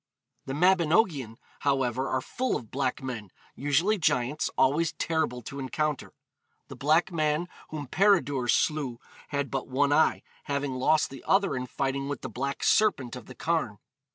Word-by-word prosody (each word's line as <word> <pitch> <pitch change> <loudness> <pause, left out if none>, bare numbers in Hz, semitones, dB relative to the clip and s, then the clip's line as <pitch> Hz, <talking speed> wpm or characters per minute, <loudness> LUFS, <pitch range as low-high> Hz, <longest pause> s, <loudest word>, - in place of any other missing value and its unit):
The 135 - -3
Mabinogion, 165 - +2 0.2
however, 130 -2 0
are 130 - 0
full 255 - -2
of 115 - -6
black 135 0 -1
men, 115 -6 -5 0.2
usually 165 +10 +1
giants, 145 -1 +1
always 155 +5 +3
terrible 160 -7 -1
to 140 +5 -7
encounter. 150 +2 -2 0.6
The - - -8
black 160 +6 +2
man 155 +1 0 0.2
whom 150 -2 -5
Peredur 145 -6 +2
slew 135 -1 +1 0.3
had 140 -1 -2
but 135 -1 -2
one 140 +2 +2
eye, 160 - +3 0.2
having 140 -2 -2
lost 150 +4 +2
the 135 - -10
other 195 -3 +3
in 125 0 -3
fighting 135 +2 -2
with 145 - -4
the - - -5
black 140 +3 -3
serpent 140 - +2
of 125 -3 -10
the 130 - -11
Carn. 160 -11 -1
140 Hz, 155 wpm, -28 LUFS, 130-160 Hz, 0.6 s, always